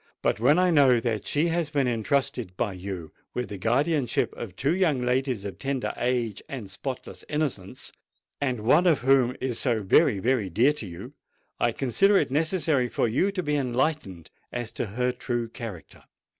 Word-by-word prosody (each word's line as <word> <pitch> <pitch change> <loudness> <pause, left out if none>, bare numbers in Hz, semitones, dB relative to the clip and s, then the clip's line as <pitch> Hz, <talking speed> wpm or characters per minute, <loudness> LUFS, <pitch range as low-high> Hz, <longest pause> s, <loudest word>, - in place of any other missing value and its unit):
But - - +1
when 140 +7 +4
I 180 0 +3
know 135 -6 +5
that 115 -3 -2
she 155 +4 +1
has 165 -1 0
been 140 -4 +1
entrusted 115 -4 -1
by 105 -4 -1
you 90 -3 -6 0.2
with 125 -1 -2
the 100 -2 -6
guardianship 135 - +1
of 100 -6 -7
two 140 - +1
young 160 -9 +1
ladies 125 -4 0
of 95 -4 -6
tender 135 -2 -2
age 120 -4 -1
and 115 -8 -6
spotless 130 +6 -6
innocence, 145 -11 -3 0.5
and 130 -5 -1
one 150 +11 +4
of 160 -5 +3
whom 130 -1 +3
is 125 -3 -2
so 115 -5 0
very, 110 - +4
very 115 -1 0
dear 120 - +3
to 115 -9 -7
you, 85 -1 -9 0.5
I 120 - +2
consider 195 - +3
it - - +1
necessary 155 -4 +1
for - - 0
you 155 - +1
to 190 -2 -3
be 150 -1 0
enlightened 130 - -1 0.2
as 120 -2 -4
to - - -3
her 125 +5 0
true 120 -1 -3
character. 110 - -9
125 Hz, 180 wpm, -26 LUFS, 110-145 Hz, 0.5 s, know